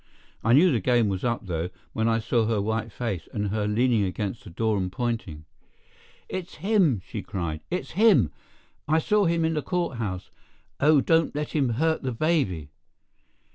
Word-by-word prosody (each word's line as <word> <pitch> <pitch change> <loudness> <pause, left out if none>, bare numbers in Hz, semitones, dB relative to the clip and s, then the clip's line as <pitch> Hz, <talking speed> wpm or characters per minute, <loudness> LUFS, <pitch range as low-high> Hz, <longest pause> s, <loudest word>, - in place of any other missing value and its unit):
I 115 - +3
knew 170 +7 +6
the 120 - +2
game 120 +1 +2
was 95 -1 -3
up, 120 -3 -1
though, 85 -1 -2 0.2
when 110 0 0
I 115 0 +3
saw 115 0 +1
her 110 -2 +1
white 110 +2 -2
face, 100 -8 -4
and 105 -1 -2
her 105 0 -1
leaning 115 0 +2
against 100 +3 -3
the 105 - -10
door 110 +5 0
and 90 -1 -2
pointing. 100 -9 -3 0.8
"It's 185 -2 -6
him!" 170 - +2
she - - -5
cried; 85 -4 -4
"it's 180 - -3
him! 200 - +4 0.6
I 155 +2 +3
saw 210 +5 +2
him 165 -1 +2
in 160 - +1
the 150 - -1
court 175 -6 -2
house. 95 -5 -4 0.5
Oh, 150 0 +5
don't 165 +2 +2
let 150 0 -2
him 140 -5 +1
hurt 160 +2 +1
the 130 -2 -2
baby!" 110 - 0
115 Hz, 180 wpm, -26 LUFS, 100-155 Hz, 0.8 s, knew